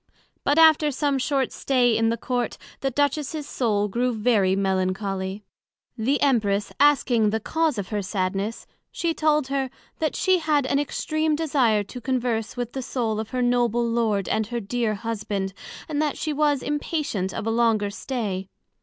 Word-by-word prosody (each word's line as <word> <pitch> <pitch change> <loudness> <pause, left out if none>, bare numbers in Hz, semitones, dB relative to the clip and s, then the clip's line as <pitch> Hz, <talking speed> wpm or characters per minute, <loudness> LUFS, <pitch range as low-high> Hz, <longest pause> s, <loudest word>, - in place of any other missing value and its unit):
But 285 +2 +2
after 315 -2 +6
some 280 0 0
short 270 -1 0
stay 245 -4 +2
in 225 +1 +2
the 230 - 0
Court, 245 0 -2 0.2
the 270 - 0
Duchess's 285 +2 -1
soul 210 -4 0
grew 245 +5 0
very 215 -4 +2
Melancholy; 190 +1 -1 0.5
the 260 +5 +1
Empress 210 -7 +1
asking 255 -6 +4
the 220 +1 0
cause 315 +4 0
of 200 -3 -4
her 210 -2 -1
sadness? 195 +2 -2 0.3
she 335 -1 -1
told 300 -3 +1
her, 270 -1 -1 0.3
That 310 -2 0
she 375 -1 +3
had 305 -4 +1
an 275 +1 +1
extreme 310 +1 0
desire 265 -9 +2
to 245 +5 -9
converse 240 -3 -1
with 245 -1 -3
the 265 - -3
soul 235 -4 -2
of 220 - -4
her 250 -1 -1
Noble 240 -1 +2
Lord 225 -4 0
and 215 0 0 0.2
dear 230 -2 0
Husband, 205 -3 -3 0.3
and 300 -1 -1
that 300 -2 -1
she 310 - -2
was 290 -2 +1
inpatient 290 - -2
of 205 - -5
a 225 - 0
longer 225 -3 +2
stay. 200 -5 -4
240 Hz, 165 wpm, -24 LUFS, 210-285 Hz, 0.5 s, after